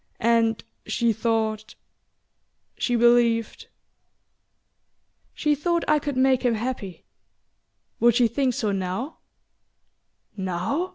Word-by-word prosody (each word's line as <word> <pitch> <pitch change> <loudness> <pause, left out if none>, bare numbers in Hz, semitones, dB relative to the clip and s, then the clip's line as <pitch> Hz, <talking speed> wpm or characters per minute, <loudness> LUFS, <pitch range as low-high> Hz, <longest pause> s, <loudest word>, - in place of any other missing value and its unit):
And 230 -1 +2 0.2
she 230 +1 +1
thought 220 -1 -2 1.0
she 245 - -1
believed 235 -1 +2 0.7
" - - -48
"She 300 -1 +1
thought 340 +4 0
I 305 0 +3
could 285 -2 -4
make 260 -1 +3
him 245 -3 +1
happy. 215 -5 -5 0.9
Would 235 -1 +4
she 240 -1 +4
think 255 +1 -1
so 210 - -1
now?" 195 - -4 1.2
"Now...? 190 - -2
235 Hz, 105 wpm, -24 LUFS, 220-260 Hz, 1.2 s, Would